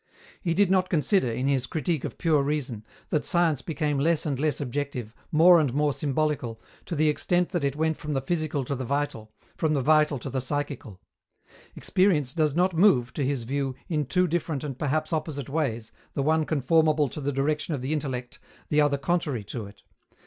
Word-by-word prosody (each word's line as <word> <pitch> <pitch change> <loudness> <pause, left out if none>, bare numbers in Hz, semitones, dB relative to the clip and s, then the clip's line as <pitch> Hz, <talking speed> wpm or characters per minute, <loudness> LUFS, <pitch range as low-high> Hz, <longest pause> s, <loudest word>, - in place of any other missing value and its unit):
He 170 -3 0
did 195 0 +3
not 185 -1 +2
consider, 165 - +2
in 125 +3 -2
his 135 -2 +1
Critique 160 -1 -1
of - - -5
Pure 155 -4 +2
Reason, 140 -6 -2 0.3
that 150 - 0
science 165 -6 +2
became 150 -2 -1
less 160 +2 +2
and 140 -4 -1
less 150 0 0
objective, 130 -4 -4 0.2
more 170 +2 +7
and 145 -5 +1
more 150 -1 +2
symbolical, 140 -6 -1 0.3
to 170 - -3
the 155 +1 +2
extent 175 +4 +1
that 175 -5 -2
it 140 0 0
went 160 0 0
from 150 0 -4
the 135 - 0
physical 155 -2 -1
to 140 - -2
the 130 -1 -3
vital, 130 -5 -2 0.3
from 155 -1 +1
the 140 - +1
vital 150 +1 +3
to 130 +2 -6
the 130 0 -1
psychical. 135 -7 -4 0.8
Experience 170 -9 +1
does 155 -3 +1
not 180 +2 +2
move, 160 - +4
to 145 - -2
his 135 -2 -1
view, 135 +1 -2
in 150 -5 -1
two 180 +5 +2
different 160 -4 -2
and 135 -4 -5
perhaps 155 +2 -1
opposite 155 -4 -3
ways, 130 -7 -2 0.2
the 140 - 0
one 155 +1 +2
conformable 155 +1 +3
to 150 - -7
the 145 +1 -1
direction 150 +3 -1
of 130 - -6
the 140 +4 -1
intellect, 130 -5 -4 0.3
the 150 0 +3
other 145 -1 +2
contrary 140 -5 -1
to 110 0 -6
it. 100 -1 -16
150 Hz, 200 wpm, -26 LUFS, 135-160 Hz, 0.8 s, more